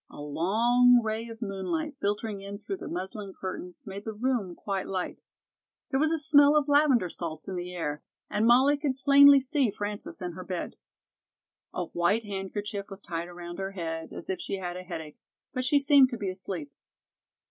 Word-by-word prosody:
A - - -12
long 230 +12 +4
ray 220 +1 -2
of 230 0 -7
moonlight, 280 - -3
filtering 205 0 -2
in 200 +1 -6
through 390 - -5
the - - -8
muslin 190 +3 -5
curtains, 180 -2 -6
made 200 0 -7
the 220 -1 -5
room 225 -6 -1
quite 195 -2 -3
light. 185 -2 -3 0.7
There 265 - +2
was 310 +2 +3
a 325 - +2
smell 290 -1 +5
of 295 -1 +1
lavender 285 -8 +4
salts 160 -2 -6
in 190 - -4
the 180 0 -4
air, 150 -4 -3 0.3
and 215 +2 +1
Mollie 265 +5 +5
could 280 -3 -1
plainly 280 +1 +8
see 270 -1 +1
Frances 205 +1 -5
in 180 -2 -4
her 185 +2 -8
bed. 180 -1 -4 1.0
A 180 - -3
white 200 +7 +1
handkerchief 200 +1 -4
was 195 -1 -8
tied 170 -3 -5
around 175 0 -8
her 195 0 -4
head, 165 -3 -4
as - - -7
if 190 - -3
she - - -3
had 180 -2 -4
a 180 - -5
headache, 160 -4 -8 0.3
but 255 -1 -1
she 285 +3 +4
seemed 280 -2 +6
to 240 - -5
be 200 -3 -2
asleep. 185 -5 -5
205 Hz, 190 wpm, -28 LUFS, 180-255 Hz, 1.0 s, plainly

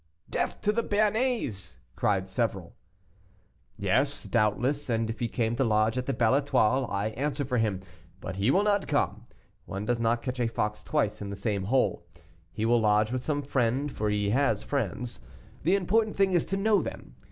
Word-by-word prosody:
"Death - - -2
to 210 - +2
the 230 +2 0
Béarnais!" 210 - 0 0.2
cried 95 -2 +1
several. 95 -3 -2 1.0
"Yes, 125 +9 0
doubtless, 125 +6 0
and 115 -1 0
if 115 - -8
he 120 - 0
came 115 0 -1
to 135 - +2
lodge 110 -1 +2
at 125 0 -2
the - - +1
Belle 120 -1 +2
Etoile, 130 -3 +2
I 100 +2 -1
answer 140 +5 -2
for 125 -2 0
him; 105 -4 0 0.4
but 95 - -6
he 100 +5 +2
will 190 +8 +4
not 205 -1 +1
come. - - -1 0.4
One 100 +2 -4
does 120 +1 0
not 115 +1 +1
catch 125 -1 -4
a 120 - +2
fox 105 -2 -2
twice 140 -11 0
in 100 - -4
the 100 - -4
same 100 -2 -2
hole. 105 -6 +1 0.5
He 105 +5 -2
will 120 0 +3
lodge 105 +1 +3
with 130 0 -2
some 145 -2 -1
friend, 135 +1 0
for 105 -3 -2
he 105 -1 0
has 140 +5 +2
friends. 125 -3 -3 0.4
The 175 +6 +3
important 215 +3 +1
thing 195 -1 +3
is 175 -3 +2
to 195 - -2
know 205 -1 +3
them. - - -7
120 Hz, 190 wpm, -28 LUFS, 105-145 Hz, 1.0 s, will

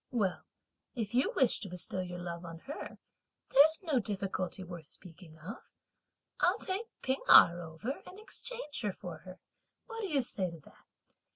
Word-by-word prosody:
Well, 205 -7 0 0.5
if 225 -3 -3
you 255 +3 +3
wish 260 -4 +3
to 200 - -6
bestow 180 +1 -3
your 180 -1 -4
love 170 -1 -5
on 165 -1 -7
her, 290 - -7 0.6
there's 315 +6 +6
no 305 -7 +2
difficulty 195 -3 -3
worth 175 -2 -8
speaking 165 -3 -12
of. 185 +10 -7 0.8
I'll - - +4
take 400 +4 -2 0.2
P'ing 265 +1 0
Erh 175 +1 +9
over 165 - -5
and 380 - -10
exchange 435 - -4
her 205 -4 -1
for 175 -4 -8
her; 185 +2 -11 0.5
what 455 -1 -6
do 410 - -1
you 295 -6 +2
say 190 -6 +1
to 170 -1 -10
that? - - -20
200 Hz, 170 wpm, -33 LUFS, 175-275 Hz, 0.8 s, Erh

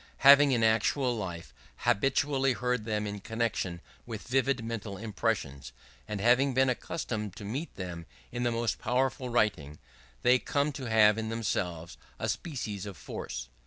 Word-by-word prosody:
Having, 140 0 +9
in 120 -3 +2
actual 115 +3 +2
life, 85 - -6 0.2
habitually 135 - +2
heard 125 -1 -1
them 105 -2 -1
in 105 0 -4
connection 105 -6 -2 0.3
with 110 -3 -7
vivid 130 -1 +1
mental 110 -4 -5
impressions, 70 - -2 0.3
and 105 -1 -3
having 125 +5 +3
been 130 0 +4
accustomed 110 - -4
to 100 - -8
meet 135 +11 -3
with 95 - -3
them 85 -2 -7 0.2
in 120 - -3
the 120 -1 +1
most 115 0 -1
powerful 130 +2 0
writing, 100 -11 0 0.5
they 125 +1 +5
come 145 +3 0
to 135 -2 -6
have 110 -1 +5
in 110 0 -3
themselves 90 -7 -2 0.2
a - - -2
species 110 - -4
of 100 - -8
force. - - -6
115 Hz, 160 wpm, -30 LUFS, 100-130 Hz, 0.5 s, Having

